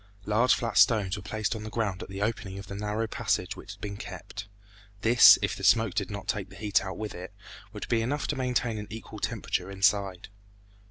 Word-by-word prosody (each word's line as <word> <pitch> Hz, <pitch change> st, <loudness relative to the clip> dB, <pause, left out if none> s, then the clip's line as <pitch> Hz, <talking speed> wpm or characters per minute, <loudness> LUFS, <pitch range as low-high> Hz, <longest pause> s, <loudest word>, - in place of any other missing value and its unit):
Large 115 Hz, +4 st, +4 dB
flat 115 Hz, -4 st, 0 dB
stones 105 Hz, -2 st, +4 dB
were 100 Hz, -, -7 dB
placed 110 Hz, +3 st, -2 dB
on 110 Hz, -, -6 dB
the 110 Hz, -, -6 dB
ground 105 Hz, -5 st, -2 dB
at -, -, -8 dB
the 95 Hz, +1 st, -3 dB
opening 105 Hz, -3 st, -3 dB
of 100 Hz, -, -7 dB
the 100 Hz, -, -8 dB
narrow 105 Hz, +2 st, -2 dB
passage 110 Hz, -, -1 dB
which -, -, -9 dB
had -, -, -18 dB
been 100 Hz, -1 st, -5 dB
kept. 100 Hz, +1 st, -8 dB, 0.5 s
This, 120 Hz, +3 st, +8 dB
if -, -, 0 dB
the -, -, -9 dB
smoke 115 Hz, -4 st, +4 dB
did 100 Hz, -3 st, -1 dB
not 100 Hz, -1 st, -6 dB
take 100 Hz, -3 st, -2 dB
the 95 Hz, -, -13 dB
heat 105 Hz, -2 st, +1 dB
out 95 Hz, 0 st, -5 dB
with 110 Hz, -1 st, -5 dB
it, 90 Hz, +3 st, -8 dB, 0.4 s
would -, -, -7 dB
be 115 Hz, -1 st, +2 dB
enough 140 Hz, +6 st, -1 dB
to 150 Hz, -, 0 dB
maintain 125 Hz, -4 st, -1 dB
an 105 Hz, -, -7 dB
equal 110 Hz, +1 st, -8 dB
temperature -, -, -2 dB
inside. 95 Hz, -1 st, +1 dB
105 Hz, 220 wpm, -28 LUFS, 100-115 Hz, 0.5 s, This